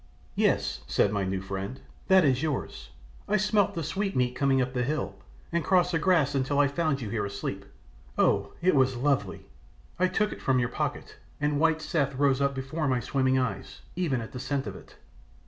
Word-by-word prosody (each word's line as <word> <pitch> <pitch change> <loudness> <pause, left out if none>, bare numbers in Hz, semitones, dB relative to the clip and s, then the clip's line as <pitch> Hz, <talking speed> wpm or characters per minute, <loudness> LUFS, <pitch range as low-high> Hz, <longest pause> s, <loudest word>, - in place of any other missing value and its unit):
"Yes," - - +1
said 100 - +2
my 100 -2 0
new 95 0 -2
friend, 95 +6 -5 0.3
"that 190 -3 +6
is 130 -2 +2
yours. 130 - -3 0.4
I 210 - +2
smelt 205 0 +2
the 165 - -2
sweetmeat 140 -9 -1
coming 135 -1 +2
up 130 0 -1
the 125 - 0
hill, 150 +5 -2 0.4
and 170 -1 0
crossed 180 -1 +3
the 165 - +1
grass 160 -5 +3
until 135 +1 0
I 145 0 +5
found 140 -1 -1
you 110 - -4
here 110 -3 -1
asleep. 100 0 -4 0.5
Oh, 100 0 +2
it 185 - +4
was 130 -2 +3
lovely! 140 +2 -1 0.5
I 185 - +4
took 210 +3 0
it - - -11
from 130 -1 +2
your 120 -1 +1
pocket, - - -4 0.2
and 150 0 0
white 160 0 +2
Seth 140 -4 0
rose 140 0 +2
up 140 0 +1
before 135 +4 -2
my 130 -2 +2
swimming 130 +1 +1
eyes, 125 -2 -3
even 155 -9 0
at 110 - -8
the 125 - -6
scent 135 +1 -2
of - - -6
it. - - -14
140 Hz, 200 wpm, -28 LUFS, 125-160 Hz, 0.5 s, that